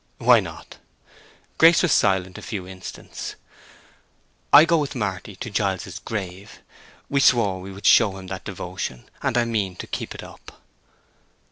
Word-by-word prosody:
"Why - - +6
not?" - - -9 0.8
Grace 165 +2 +7
was 175 - +2
silent 95 -3 +2
a - - -11
few 95 -4 -5
instants. 95 0 -8 1.2
"I 155 - +9
go 165 -1 +3
with 145 -2 -3
Marty 100 -3 -4
to 115 +4 -7
Giles's 95 -3 -2
grave. 100 -1 -6 0.5
We 140 - +1
swore 110 -8 +3
we 95 +1 -8
would 100 +1 -11
show 95 -2 +5
him 95 - -9
that 95 0 -6
devotion. 60 -1 -6
And 120 - 0
I 120 - +3
mean 105 -6 -2
to - - -7
keep - - -5
it - - -8
up." - - -14
100 Hz, 155 wpm, -23 LUFS, 95-115 Hz, 1.2 s, I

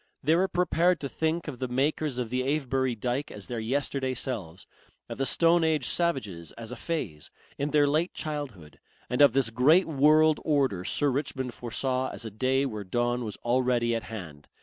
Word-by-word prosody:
They 155 +4 +4
were 185 +3 +3
prepared 175 -1 +2
to 140 - -2
think 160 +4 -2
of 135 -5 -6
the 130 - -2
makers 135 +2 0
of 120 -3 -3
the 125 0 0
Avebury 130 -2 0
dyke 125 +6 -2
as 100 -2 -9
their 120 -2 -4
yesterday 130 +2 -1
selves, 100 -10 -5 0.4
of - - -7
the 135 - +1
stone 170 +3 +4
age 155 -5 +1
savages 105 - -1
as 115 0 -8
a - - -5
phase, 115 - -4 0.3
in 140 +1 0
their 150 -1 +4
late 155 +5 0
childhood, 130 - -6 0.3
and 125 - +1
of 140 -5 +7
this 130 -4 +1
great 150 +11 +5
world 155 +1 +4
order 135 - +1
Sir 145 +8 0
Richmond 130 -2 -3
foresaw 130 +2 -2
as 115 - -5
a 110 - -5
day 130 +5 +1
where 110 -6 -4
dawn 120 +5 -1
was 105 -3 -5
already 120 -1 +1
at 115 - -2
hand. 85 -10 -9
130 Hz, 190 wpm, -28 LUFS, 115-150 Hz, 0.4 s, of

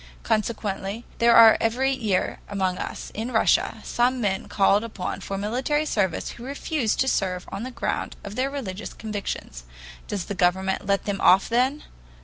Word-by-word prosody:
Consequently 215 0 -2
there 235 0 +5
are 225 -1 +9
every 250 +4 +1
year 215 -8 -1
among 190 -2 -1
us - - -6
in 225 +4 -4
Russia 220 - +2
some 250 +2 +1
men 195 -4 -1
called 200 +1 +3
upon 215 -5 -5
for 195 - -4
military 255 +9 0
service 195 - -1
who 235 - -11
refuse 275 -3 -1
to 265 - +1
serve 180 -7 -1
on - - -4
the 255 - -4
ground 255 - -3
of 200 - -7
their 260 +3 0
religious 220 -8 -5
convictions. 205 - -5 0.4
Does 195 -4 -3
the - - -4
government 190 +1 +1
let 200 0 +1
them 200 -1 -2
off 190 +2 +6
then? 255 +5 +1
215 Hz, 165 wpm, -24 LUFS, 195-245 Hz, 0.4 s, are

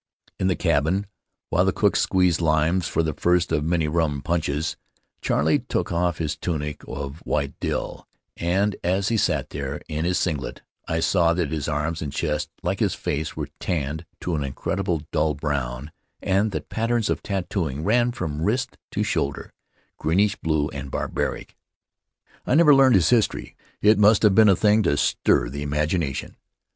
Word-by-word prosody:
In 95 - +1
the 95 - +2
cabin, 80 +8 +1 0.5
while - - +3
the - - +2
cook - - +1
squeezed 90 -3 +2
limes 80 +2 +2
for 80 - 0
the 80 -1 -1
first 90 +2 +1
of 75 -2 +1
many 80 -1 +1
rum 75 -3 0
punches, 80 -2 -1 0.5
Charley 75 +3 +2
took - - -3
off 85 -1 0
his 75 -2 -2
tunic 75 -3 -4
of 70 +2 -6
white 70 -4 -2
drill, - - -3 0.3
and 95 +4 0
as 95 +3 +1
he 115 - +1
sat - - 0
there 70 0 -4
in 80 0 -3
his 90 +1 +1
singlet 75 -6 -2 0.2
I 80 0 -1
saw 85 -1 +3
that 85 -4 -1
his 75 -3 -2
arms 80 +1 -2
and 75 -2 -4
chest, 75 0 -2
like - - -1
his - - +1
face, 75 +1 -3
were - - -4
tanned 80 -1 -3
to 90 - -2
an 75 - -1
indelible 85 +4 -2
dull 75 -2 +1
brown, 70 -2 -3 0.3
and 100 +3 +1
that - - -5
patterns 115 0 0
in - - +1
tattooing 90 -7 -3
ran 120 +5 +3
from 80 -10 -4
wrist 125 +8 -1
to - - 0
shoulder 70 0 -2 0.2
— - - -41
greenish 100 +6 +2
blue 80 -4 0
and 70 0 -7
barbaric. - - -3 0.9
I 125 - +3
never 155 -2 +7
learned 135 -3 +6
his 90 -3 +3
history 115 -3 +1
— - - -37
it 105 0 +5
must 105 +1 +5
have 105 -2 +6
been 110 +1 +6
a 95 - +6
thing 105 +3 +3
to 85 -7 +1
stir - - +2
the 70 +3 -6
imagination. 75 0 -2
80 Hz, 175 wpm, -24 LUFS, 75-95 Hz, 0.9 s, never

